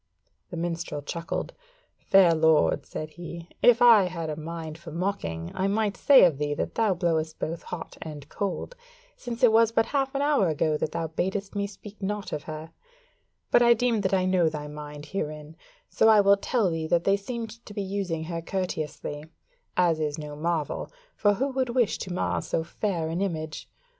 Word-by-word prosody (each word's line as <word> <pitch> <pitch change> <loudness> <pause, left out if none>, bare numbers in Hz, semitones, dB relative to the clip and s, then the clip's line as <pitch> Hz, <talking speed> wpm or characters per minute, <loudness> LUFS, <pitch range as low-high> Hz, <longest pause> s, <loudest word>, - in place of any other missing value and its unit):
The 170 - -6
minstrel 165 -3 -3
chuckled: 165 +3 -4 0.5
"Fair 190 -3 +5
lord," 160 -1 +3
said 155 0 -6
he, 170 +1 -9
"if 245 -1 +6
I 225 -5 +8
had 165 -3 -4
a - - -3
mind 160 0 -6
for 170 - -10
mocking 85 - -3
I 190 - 0
might 205 0 0
say 280 -2 +7
of 155 -6 +1
thee 145 0 -1
that - - -3
thou 215 -4 +2
blowest 160 -2 0
both 165 +1 -4
hot 180 - -8
and 150 -3 -8
cold, 200 - -4 0.4
since 240 +1 -6
it 240 - +7
was 225 0 +5
but 225 0 +2
half 270 +1 -1
an 275 - +1
hour 285 -10 +3
ago 155 0 +1
that 150 - -2
thou 165 - -1
badest 190 +5 -3
me 200 -1 -1
speak 210 +1 -13
naught 205 +1 -3
of 150 - -2
her: 155 0 -7 0.8
but - - +6
I 235 0 +6
deem 230 -2 +1
that 190 - 0
I 185 -1 +1
know 185 -3 +3
thy 150 -1 -6
mind 150 0 -8
herein: 155 -3 -5 0.3
so 220 - +3
I 215 -1 +7
will 200 0 +6
tell 200 -1 0
thee 160 -1 -2
that 170 +1 +2
they 195 - +4
seemed 230 +2 -6
to - - -9
be 205 -1 -3
using 190 -4 -2
her 165 0 -4
courteously; 155 -4 -4 0.5
as 170 -3 +3
is 150 -1 -1
no 150 -1 -7
marvel; 160 0 -2 0.2
for 205 -1 +3
who 270 +6 0
would 260 -2 -1
wish 235 -2 +1
to 185 - -5
mar 90 - -1
so 160 - -1
fair 170 -1 -2
an 170 +3 -2
image? 160 -5 -4
175 Hz, 195 wpm, -27 LUFS, 155-205 Hz, 0.8 s, I